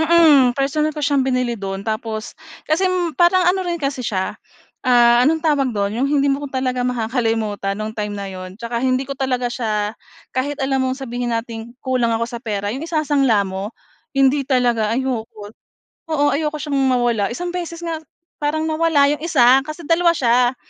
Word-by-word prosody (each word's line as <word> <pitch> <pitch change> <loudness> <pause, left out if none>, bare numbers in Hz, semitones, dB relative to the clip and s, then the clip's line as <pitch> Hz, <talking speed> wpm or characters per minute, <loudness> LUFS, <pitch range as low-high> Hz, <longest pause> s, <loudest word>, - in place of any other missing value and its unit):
Mm, 310 -6 +5
personal 300 +3 0
ko 300 - -1
siyang 285 -1 +2
binili 255 -2 0
do'n, 195 -3 -5
tapos 220 0 -4 0.3
kasi 350 +5 +1 0.3
parang 360 +1 +5
ano 365 +2 +3
rin 350 -2 -2
kasi 275 -4 -3
siya, 190 -6 -2 0.5
ah, 240 -1 +5
anong 310 +5 +2
tawag 285 -4 +2
do'n? 200 0 0
'Yong 275 - +1
hindi 280 -1 +2
mo 285 +1 -3
talaga 260 -1 -2
makakalimutan 225 -4 -1
no'ng 215 +1 -4
time 210 -1 -4
na 200 - -5
'yon, 185 +1 -8
tsaka 235 0 -4
hindi 255 +1 +1
ko 275 - -5
talaga 255 -3 -1
siya 215 -4 -1 0.4
kahit 275 +2 -2
alam 270 0 0
mong 255 - -2
sabihin 245 -2 -4
nating 230 +1 -7
kulang 255 -3 +1
ako 230 - -1
sa 235 0 -7
pera, 205 -3 -3
'yong 265 - -5
isasangla 290 -9 +1
mo? 190 +3 -6 0.4
Hindi 275 +1 +4
talaga, 240 -5 +2
ayoko. 225 -4 -3 0.6
Oo, 290 -2 +2
ayoko 300 +1 -1
siyang 285 -3 -1
mawala. 240 -5 +2
Isang 350 +9 -4
beses 345 -1 -5
nga 330 -2 -3 0.4
parang 305 +1 -1
nawala 310 -3 +3
'yong 295 - -2
isa, 265 -6 +5
kasi 310 +2 -7
dalawa 340 +2 +3
siya. 245 -1 +2
255 Hz, 175 wpm, -20 LUFS, 230-295 Hz, 0.6 s, Mm